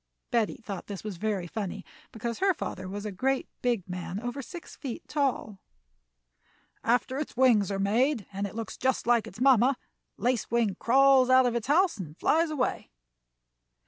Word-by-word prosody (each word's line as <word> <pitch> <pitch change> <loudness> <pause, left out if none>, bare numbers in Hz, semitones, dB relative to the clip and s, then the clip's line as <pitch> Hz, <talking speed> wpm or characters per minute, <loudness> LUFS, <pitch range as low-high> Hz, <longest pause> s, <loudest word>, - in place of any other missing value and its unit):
Betty 230 -3 +1
thought 200 -6 -7
this 200 -2 -6
was 210 -4 -5
very 205 -2 -1
funny, 195 +1 -5 0.3
because 230 +1 -4
her 385 -2 +3
father 185 -8 -5
was 205 +2 -6
a 210 - -3
great 265 +7 0
big 235 -7 0
man 180 +1 -5
over 245 +4 -4
six 340 +6 -10
feet 260 -5 -7
tall. 265 -8 -1 1.2
"After 250 +3 +1
its 295 - -5
wings 235 -7 +4
are 195 - -2
made 225 +4 +1
and 200 +1 -2
it 200 - -11
looks 225 -1 -5
just 260 0 0
like 235 -1 +3
its 195 - -11
mamma, 260 0 +5 0.4
Lace 245 +2 0
Wing 230 -5 +1
crawls 265 +1 +5
out 260 0 +6
of 245 - +1
its 235 -1 -2
house 330 - +3
and 160 -3 -7
flies 325 +1 +2
away." 285 -5 -2
235 Hz, 175 wpm, -28 LUFS, 200-260 Hz, 1.2 s, out